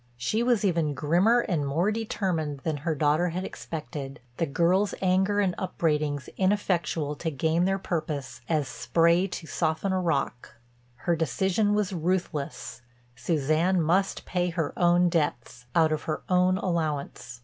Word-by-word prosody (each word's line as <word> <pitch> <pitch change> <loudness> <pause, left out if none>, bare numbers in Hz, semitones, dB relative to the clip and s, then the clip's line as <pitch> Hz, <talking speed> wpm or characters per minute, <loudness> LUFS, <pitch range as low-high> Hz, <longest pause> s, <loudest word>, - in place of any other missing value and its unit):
She 170 - 0
was 235 -3 +2
even 165 -6 +1
grimmer 180 - +3
and 175 -10 -1
more 160 +9 +1
determined 180 -10 -2
than 155 -1 -2
her 155 +3 -2
daughter 150 +4 +2
had 180 +3 -3
expected, 150 -3 -6 0.2
the 165 - 0
girl's 175 +7 +2
anger 190 +2 +2
and 190 -3 +2
upbraidings 150 -6 -1
ineffectual 180 -6 0
to 165 - -2
gain 160 +4 +1
their 195 +1 +1
purpose 150 -9 -4
as 155 -4 +1
spray 170 +3 +2
to 180 -3 -6
soften 160 +4 -1
a 185 - +1
rock. 140 -7 -2 0.5
Her 170 - +3
decision 190 - +1
was 205 -2 0
ruthless; 165 -8 -2 0.3
Suzanne 155 +7 +1
must 180 +5 +1
pay 180 -1 0
her 165 -4 -2
own 175 0 +4
debts, 135 -7 -2
out 160 -2 +4
of 155 - -1
her 155 - -3
own 180 0 +3
allowance. 155 -9 -3
170 Hz, 150 wpm, -27 LUFS, 150-185 Hz, 0.5 s, own